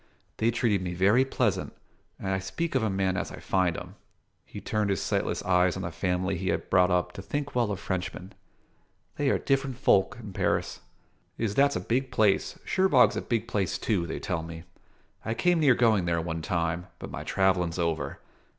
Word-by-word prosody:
They 115 - +2
treated 115 -4 +1
me 90 -1 -4
very 100 +8 +4
pleasant, 125 -6 -1 0.4
and 95 - -4
I 95 0 0
speak 165 - -3
of - - +2
a 110 - +1
man 95 -1 0
as 100 - -3
I - - -8
find 90 -3 0
en." 90 +1 -8 0.5
He - - -9
turned 105 -1 -1
his 100 - +1
sightless - - -1
eyes 90 -1 +3
on 95 - -4
the 85 - -4
family 90 +2 -1
he 95 - -2
had - - -2
brought 90 -1 +5
up 90 -1 +1
to - - -8
think 145 +8 -4
well 120 -3 +1
of 100 - -3
Frenchmen. 95 +1 -4 0.8
"They 145 -1 +1
are - - +3
different 135 -2 0
folk 100 +2 +3
in 105 -4 -9
Paris." - - -1 0.6
"Iss, 110 -3 -1
that's 140 +4 +3
a - - 0
big 125 +8 -1
place. 110 -5 +2
Cherbourg's 185 -10 +4
a - - -1
big 115 -2 -2
place, 100 -3 -1
too, 95 -7 0
they 80 - -4
tell 90 -4 -2
me. 80 0 -8 0.6
I 110 - -2
came 175 +5 +2
near 140 -5 +5
going 110 -7 +3
there, 85 -1 +1
one 80 -1 -3
time; 85 +1 -1
but - - -8
my - - -5
travellin's 90 -3 +1
over. 80 -5 -1
95 Hz, 200 wpm, -28 LUFS, 90-115 Hz, 0.8 s, brought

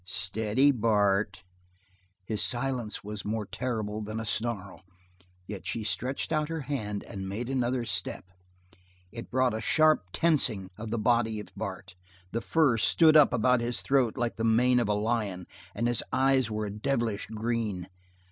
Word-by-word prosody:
"Steady, 105 +9 +2
Bart!" 105 -5 +1 0.8
His 110 0 -1
silence 120 -3 -1
was 105 0 -6
more 105 0 -2
terrible 110 -2 -3
than 110 +1 -5
a 115 - -4
snarl; 105 -3 -3 0.6
yet 100 0 -7
she 115 - -3
stretched 120 - -1
out 155 -1 0
her 165 -1 -3
hand 110 -7 -4
and 95 -1 -7
made 110 +5 -4
another 125 -2 0
step. 95 -2 -2 0.8
It 115 0 -8
brought 130 -1 +2
a 110 - -3
sharp 155 -6 +3
tensing 120 - +1
of 110 +2 -7
the 115 - -1
body 115 -1 +1
of 105 - -9
Bart - - -6 0.4
the 115 - -2
fur 120 +4 +2
stood 155 +8 +5
up 150 -2 +7
about 125 +1 +2
his 120 +1 -2
throat 130 -5 +2
like 120 -1 -2
the 110 - -2
mane 125 +3 +4
of 115 -3 0
a - - +3
lion, 105 -4 -1 0.3
and 115 - 0
his 120 -1 +2
eyes 130 -2 +3
were 110 0 -2
a 100 - -4
devilish 110 -1 -2
green. 110 -4 -3
115 Hz, 165 wpm, -28 LUFS, 105-125 Hz, 0.8 s, up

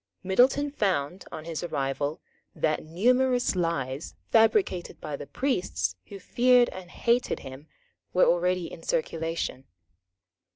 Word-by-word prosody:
Middleton 255 +9 +3
found, 185 - -1
on 155 - -7
his 165 -2 -4
arrival, 145 -2 -2 0.3
that 155 -1 0
numerous 245 +9 +2
lies, 150 -5 -2 0.2
fabricated 225 - +2
by 150 -2 -5
the 140 - -8
priests 255 -9 -1
who 200 - -8
feared 245 +4 +4
and 185 -1 -9
hated 235 +6 0
him, 135 +2 -10 0.4
were 185 - +4
already 180 +1 +2
in - - -9
circulation. 165 - -2
180 Hz, 120 wpm, -27 LUFS, 155-245 Hz, 0.4 s, feared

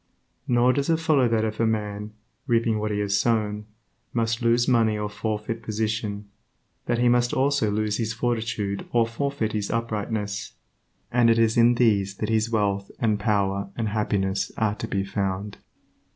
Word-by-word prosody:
Nor 125 0 +4
does 140 +2 -1
it 165 - +4
follow 155 -6 +3
that 115 -1 +1
if 110 0 -4
a 115 - +3
man 105 -1 -3 0.3
(reaping 115 -3 +2
what 105 0 -1
he 105 - -1
has 100 0 +1
sown) 105 -2 0 0.5
must 115 0 0
lose 120 +1 +3
money 115 -4 +3
or 105 0 -2
forfeit 105 +2 -3
position, 110 -1 -2 0.6
that 120 - +1
he 120 +1 +3
must 120 0 +3
also 135 -4 +2
lose 105 0 0
his 115 -2 -1
fortitude 110 -4 -2
or 120 -1 +4
forfeit 115 0 -2
his 105 -2 -2
uprightness, 110 -2 -3 0.6
and 120 -1 +4
it 115 - +4
is 115 -1 +3
in 120 +1 +5
these 100 -5 +2
that 105 +2 -3
his 110 0 +1
wealth 100 -3 0
and 110 -3 +1
power 100 -1 0
and 110 -2 -1
happiness 100 -2 -1
are 110 -2 +1
to - - -5
be 100 0 -1
found. 100 0 -3
110 Hz, 170 wpm, -25 LUFS, 105-115 Hz, 0.6 s, in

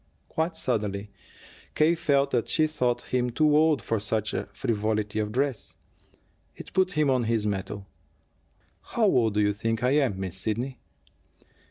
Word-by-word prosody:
Quite 160 +1 -1
suddenly 105 -6 -2 0.6
K. 155 +2 +4
felt 140 -4 +1
that 120 -2 0
she 155 - +3
thought 125 -7 -2
him 125 -1 +2
too 150 +4 +3
old 155 -2 +3
for 115 - 0
such 105 +1 -1 0.2
frivolity 110 -1 -1
of 105 -1 -1
dress. 135 0 -2 0.8
It - - -11
put 185 -1 +2
him 150 -4 +2
on 125 -3 +1
his 110 -2 0
mettle. 100 0 -3 1.0
"How 230 - 0
old 115 - +3
do 105 - +3
you 105 0 +2
think 115 +2 -2
I 125 - +3
am, 135 -9 +2
Miss 95 -2 -4
Sidney?" 115 +7 -3
120 Hz, 155 wpm, -27 LUFS, 105-145 Hz, 1.0 s, K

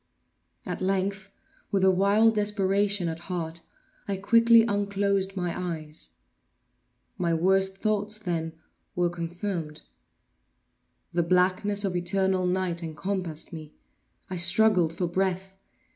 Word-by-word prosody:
At - - -5
length, 195 +1 -1 0.4
with 195 -2 +1
a 190 - +6
wild 200 +4 +4
desperation 205 -2 +1
at 165 0 -4
heart, 170 -2 -4 0.5
I 200 -1 -2
quickly 230 +3 +5
unclosed 200 -2 0
my 175 -2 -1
eyes. 160 -4 -6 1.0
My 170 -2 +1
worst 190 +3 +2
thoughts, 215 0 0
then, 170 -6 -3 0.4
were 175 -1 +1
confirmed. 170 -2 -5 1.3
The 175 - +2
blackness 185 +4 +1
of 185 -2 -2
eternal 185 +1 +1
night 180 -2 -1
encompassed 170 0 -4
me. 155 -2 -9 0.5
I 185 - -5
struggled 180 -1 +4
for 170 +2 -2
breath. 190 +2 -2
190 Hz, 115 wpm, -27 LUFS, 175-200 Hz, 1.3 s, a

